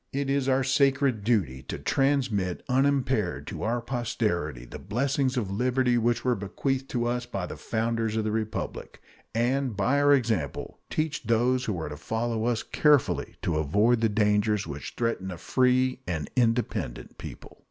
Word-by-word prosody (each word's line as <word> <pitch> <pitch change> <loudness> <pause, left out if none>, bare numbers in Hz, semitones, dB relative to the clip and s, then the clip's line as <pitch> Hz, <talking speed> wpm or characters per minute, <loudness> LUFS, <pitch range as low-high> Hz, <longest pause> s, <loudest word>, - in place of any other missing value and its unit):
It 140 0 -1
is 135 -1 +1
our 130 0 +3
sacred 135 -4 +2
duty 95 - +1
to - - -4
transmit 125 -10 0
unimpaired 130 -6 +1
to - - -6
our 120 +2 0
posterity 105 - -2
the - - -9
blessings 130 +5 0
of 105 -6 -1
liberty 125 +3 +2
which 120 +2 0
were 125 - +3
bequeathed 130 +6 -2
to 120 -2 -1
us 120 0 -1
by 100 -6 -3
the - - -7
founders 115 -1 -1
of 110 - +1
the 105 - -1
Republic. 110 0 -4 0.4
and 125 -1 0
by 125 +9 +2
our 145 0 +5
example 110 - 0
teach 155 -1 -1
those 125 +3 +2
who 100 -6 -2
are 80 - -4
to 75 - -7
follow 110 +5 -2
us 120 -2 0
carefully 150 -4 +2
to 80 - 0
avoid 105 +10 +3
the 115 - +3
dangers 105 0 +2
which 75 -2 -7
threaten 115 -5 -1
a 90 - -6
free 130 +5 +2
and 80 -4 -3
independent 115 - -1
people. - - -10
115 Hz, 165 wpm, -27 LUFS, 105-130 Hz, 0.4 s, our